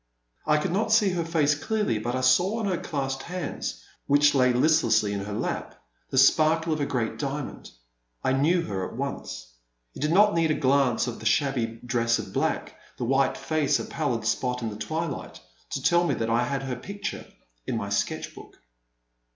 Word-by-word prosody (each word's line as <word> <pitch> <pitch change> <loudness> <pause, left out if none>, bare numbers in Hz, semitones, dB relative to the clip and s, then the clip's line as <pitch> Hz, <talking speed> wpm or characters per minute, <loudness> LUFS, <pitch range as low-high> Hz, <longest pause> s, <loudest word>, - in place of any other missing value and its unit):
I 150 - +4
could 170 +4 -1
not 215 +4 0
see 220 -2 +5
her 175 -2 -1
face 160 -3 +2
clearly, 210 - -1
but 120 +3 -2
I 130 - -1
saw 175 - +3
on 225 - -2
her 185 -3 0
clasped 135 -2 -3
hands, 145 - -5 0.2
which 145 +1 +5
lay 130 -2 +4
list 155 +6 +3
lessly 105 -1 +2
in 100 -1 -3
her 105 - -6
lap, 105 - -3 0.3
the - - -3
sparkle 155 +4 +4
of 155 - -2
a 140 - 0
great 115 -4 -2
diamond. 140 0 -4 0.5
I 130 - +2
knew 165 +6 +2
her 95 - -3
at - - -11
once. 140 - -5 0.5
It - - -10
did 150 +1 +1
not 205 +4 +5
need 165 -1 +2
a 155 - +2
glance 130 -2 +2
at 120 - -5
the 110 - -2
shabby 120 -4 0
dress 115 -1 +1
of - - -7
black, - - -1 0.2
the 120 - -2
white 135 +2 +2
face, 155 -3 +1
a - - -4
pallid 125 -8 -2
spot 125 +2 -1
in 110 - -2
the - - -7
twilight, 160 +5 -4 0.3
to - - -4
tell 175 0 +4
me 175 - +1
that 115 0 -2
I 120 +1 +2
had 135 +1 -2
her 130 -2 -3
picture 200 +10 -6 0.4
in - - -1
my - - -3
sketch - - -2
book. - - -14
140 Hz, 200 wpm, -26 LUFS, 120-165 Hz, 0.5 s, see